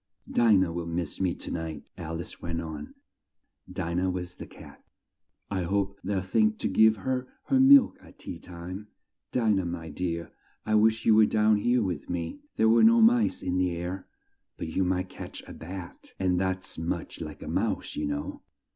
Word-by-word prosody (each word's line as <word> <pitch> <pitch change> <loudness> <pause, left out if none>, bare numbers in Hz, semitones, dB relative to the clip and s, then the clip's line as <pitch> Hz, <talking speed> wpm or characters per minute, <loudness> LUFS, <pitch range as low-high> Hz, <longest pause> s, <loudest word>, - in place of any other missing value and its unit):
"Di 120 -2 +4
nah 95 -3 +3
will 85 0 -4
miss 85 +1 -3
me 90 -2 +1
to - - -7
night," 80 -2 -4
Al 80 0 -5
ice 85 - -8
went 85 -1 -3
on. 80 -3 -7 0.8
(Di 85 0 -3
nah 90 +2 +1
was 90 -1 -4
the - - -9
cat.) - - -14 0.7
"I 95 -2 0
hope 100 +2 -1
they'll 95 -1 -1
think 105 +2 +2
to - - -1
give 110 +3 +5
her 130 +4 -2 0.2
her 270 - +4
milk 270 0 +7
at - - -17
tea - - -8
time. 90 +4 -8 0.4
Di 115 -3 +2
nah, 95 -2 +1
my 85 -2 -5
dear! 85 +1 -3 0.3
I 110 - 0
wish 110 +1 +3
you 110 - +6
were 110 0 +6
down 110 0 +3
here 120 +3 +2
with 90 -7 -4
me! 90 - -3 0.2
There 110 0 +4
are 115 - +5
no 230 +1 +7
mice 230 +1 +4
in 90 0 0
the 90 -1 +1
air, 90 +2 -5 0.5
but - - -4
you 95 +4 0
might 90 0 0
catch - - -9
a - - -10
bat, 90 +1 -9
and 90 -1 +1
that's 95 -2 -2
much 85 +1 -4
like - - -7
a - - -8
mouse, - - -1
you 75 - -2
know. 75 0 -4
95 Hz, 195 wpm, -28 LUFS, 85-110 Hz, 0.8 s, milk